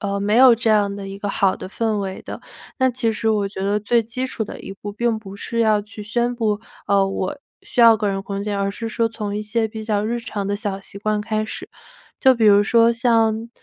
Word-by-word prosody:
呃， 200 -1 -2
没 205 +1 0
有 255 0 +8
这 230 0 -1
样 205 -2 +2
的 195 -1 -7
一 195 0 -7
个 205 0 -4
好 195 -1 +2
的 - - -8
氛 220 0 -1
围 190 -1 -4
的， - - -8 0.4
那 260 0 +3
其 235 -2 -1
实 220 +1 0
我 210 -2 +1
觉 195 -1 -6
得 205 +1 +1
最 230 +3 +2
基 250 +4 -4
础 235 - -4
的 - - -7
一 195 - -8
步 205 +1 -7
并 225 +2 0
不 200 -2 -10
是 230 +2 -3
要 215 -2 +3
去 210 +1 -10
宣 240 +4 -1
布， 220 -3 0 0.3
呃， 200 -1 +4
我 195 +7 -3 0.2
需 245 - -2
要 230 -1 +8
个 215 -2 -1
人 195 -1 -1
空 200 0 -4
间， 205 -1 -2
而 195 0 0
是 225 +3 -5
说 230 +1 0
从 210 -2 -4
一 - - -2
些 220 +1 0
比 220 0 -7
较 210 -1 0
日 235 +2 -1
常 210 -3 -5
的 205 +1 -1
小 200 -2 -3
习 200 - -9
惯 215 0 -1
开 215 0 -1
始， 220 - -7 0.5
就 260 -1 +5
比 230 -2 +1
如 205 0 +6
说 230 +2 +4
像 230 -1 +1
215 Hz, 270 characters per minute, -21 LUFS, 200-230 Hz, 0.5 s, 有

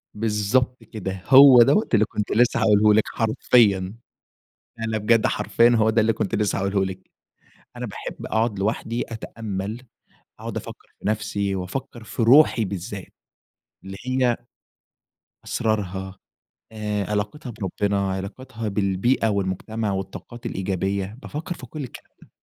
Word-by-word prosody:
بالضبط 115 +3 0
كده، 95 -4 -6
هو 135 -2 +9
دوّة 140 - +4
اللي 110 -1 +5
كنت 105 0 -4
لسه 120 +2 +3
هاقوله 105 0 +5
لِك 110 - +4
حرفيًا. 110 -4 +3 0.9
لأ، 115 - -4
لأ، 110 -1 -1
بجد 110 +1 +3
حرفيًا 115 0 +3
هو 110 -2 +3
ده 115 +1 +3
اللي 110 +1 +3
كنت 110 -2 -2
لسه 105 -2 0
هاقولهُ 100 0 +1
لِك، 95 0 -7 0.7
أنا - - -4
باحب - - -7
أقعد 110 -2 0
لوحدي 110 +3 -1
أتأمل، 110 0 -5 0.6
أقعد - - -6
أفكر - - -8
في - - -8
نفسي 105 -2 -1
وأفكر 110 +5 -5
في 115 - -3
روحي 125 -2 +6
بالذات، 95 0 -6 0.7
اللي 95 0 -8
هي 130 -2 +1 1.1
أسرارها 95 -4 -2 0.6
آآ، 105 -2 -3
علاقتها 105 +7 -3
بربّنا، 100 +1 -1
علاقتها 110 +4 -5
بالبيئة 100 +4 +1
والمجتمع 100 +2 -2
والطاقات 95 +5 -6
الإيجابية، 95 +1 -2
بافكر 160 +4 -5
في 130 - -10
كل 145 +3 -6
الكلام 125 - -12
ده. - - -17
105 Hz, 135 wpm, -23 LUFS, 100-115 Hz, 1.1 s, هو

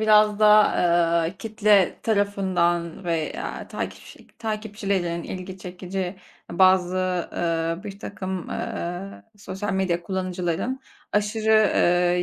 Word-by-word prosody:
biraz 215 -1 +5
da, 210 0 +6 0.5
eee, - - -10
kitle 210 -3 +3
tarafından 190 -5 0
veya 165 -3 -3
takipçi - - -7
takipçilerinin 200 -6 -2
ilgi 185 +1 -7
çekici, 185 +1 -5 0.3
bazı, 185 0 +4 0.4
ııı, 165 +1 -1
birtakım, 195 -2 -6
eee, 180 +3 -5
sosyal 205 0 -4
medya 185 -3 0
kullanıcıların 185 +6 -2 0.3
aşırı, 215 +1 0
eee, 180 -4 +3
190 Hz, 95 wpm, -24 LUFS, 175-210 Hz, 0.5 s, da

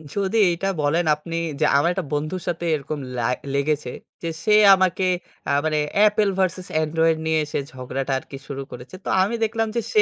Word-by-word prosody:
যদি 200 +2 0 0.2
এটা 195 +3 -3
বলেন 160 +4 +1
আপনি 165 +2 -7 0.2
যে 155 - +3
আমার 170 +4 +3
একটা 185 -4 -3
বন্ধুর 155 +5 -2
সাথে 170 0 -2
এরকম 145 +1 -5 0.2
লা 120 +1 0 0.2
লেগেছে 140 -2 0 0.3
যে 165 - -1
সে 210 - +3 0.2
আমাকে 185 0 +1 0.4
আ - - +2
মানে 155 -1 +1 0.3
Apple 210 -1 +3
ভার্সেস 185 -1 0 0.2
Android 160 +1 +2
নিয়ে 160 0 +2
সে - - -1
ঝগড়াটা 130 +1 -4
আরকি 135 - -10
শুরু 140 -1 -5
করেছে। 125 +9 -10
তো - - -3
আমি 210 +5 -1
দেখলাম 225 0 0
যে 235 - +1
সে 430 - +6
165 Hz, 185 wpm, -23 LUFS, 145-190 Hz, 0.4 s, সে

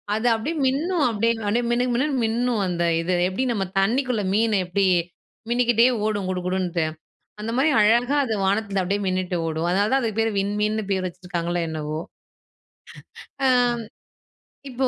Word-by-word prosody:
அது 220 +3 0
அப்படியே 300 +10 -3
மின்னும் 305 +4 0
அப்படியே, 230 +1 +1
அப்படியே 235 +4 +1
மினுமினுன்னு 250 +3 0
மின்னும் 235 0 0
அந்த 175 -1 -1 0.2
இது. 180 +2 -1 0.2
எப்படி 190 +8 -2
நம்ம 195 -3 -1
தண்ணிக்குள்ள 235 +2 +1
மீன 220 0 +2
எப்படி 190 +2 0 0.6
மின்னிக்கிட்டே 240 -1 +3 0.2
ஓடும் 205 -3 -1
குடுகுடுன்ட்டு, 180 -2 -1 0.6
அந்த 225 +2 -3
மாதிரி 285 +4 +3
அழகா 240 +6 +3
அது 225 - -2
வானத்துல 200 0 0
அப்படியே 200 +3 -1
மின்னிட்டு 185 -1 -1
ஓடும். 160 +1 -2
அதனாலதான் 210 +8 +2
அதுக்கு 225 -1 -2
பேரு 225 0 +1
விண்மீன்னு 210 +2 -1
பேர் 190 -1 0
வச்சிருக்காங்களோ 175 -1 -4
என்னவோ! 155 0 -4 1.5
ஆ - - +5 1.2
இப்போ, 260 +1 0
210 Hz, 135 wpm, -23 LUFS, 185-240 Hz, 1.5 s, ஆ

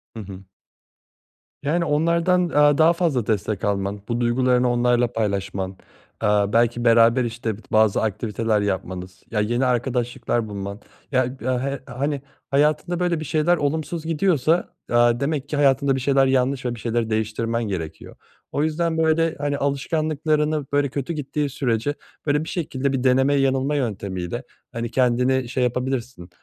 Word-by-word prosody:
Hı 115 - -6
hı. 95 0 -10 1.2
Yani, 165 +4 0
onlardan, 170 +4 +2
aaa, 145 -1 +4
daha 165 +1 +5
fazla 160 - 0
destek 105 -2 -1
alman, 100 0 -1
bu 120 +1 -1
duygularını 125 +1 +2
onlarla 120 0 +2
paylaşman, 100 -3 -2 0.5
eee, - - +3 0.3
belki 120 +1 +2
beraber, 115 +2 +5
işte, 115 -2 -3 0.2
bazı 110 -2 +3
aktiviteler 110 0 0
yapmanız, 95 -2 -4
ya, 105 - 0
yeni 120 +5 +1
arkadaşlıklar 120 -2 -1
bulman, 100 0 -5 0.3
ya, 130 -1 +3 0.2
he 130 +3 -1
hani, 140 +2 -3 0.3
hayatında, 150 +5 +1
böyle, 175 -2 +1
bir 155 - -5
şeyler 160 +4 +2
olumsuz 155 +3 -2
gidiyorsa, 165 -1 +1 0.2
aaa, 120 0 +4
demek 145 -1 -2
ki - - -2
hayatında 140 -1 +3
bir - - -1
şeyler 135 +1 +3
yanlış 130 0 +1
ve 120 -1 -1
bir - - -11
şeyleri 115 0 -1
değiştirmen 110 +2 -1
gerekiyor. 85 -7 -5 0.4
O 145 - 0
yüzden, 160 +1 0
böyle, 160 0 +2
hani, 145 -1 -1
alışkanlıklarını, 155 +1 0
böyle, 145 -1 +2
kötü 140 +4 -3
gittiği 150 -1 -2
sürece, 130 +1 -1 0.3
böyle, 150 0 +1
bir 160 - -7
şekilde 140 -6 -2
bir 130 -2 -1
deneme 130 +2 +3
yanılma 135 +1 +1
yöntemiyle, 100 -3 -3 0.3
hani, 115 0 -4
kendini 125 0 +2
şey 130 0 0
yapabilirsin, 125 -6 -2
130 Hz, 150 wpm, -23 LUFS, 115-150 Hz, 1.2 s, daha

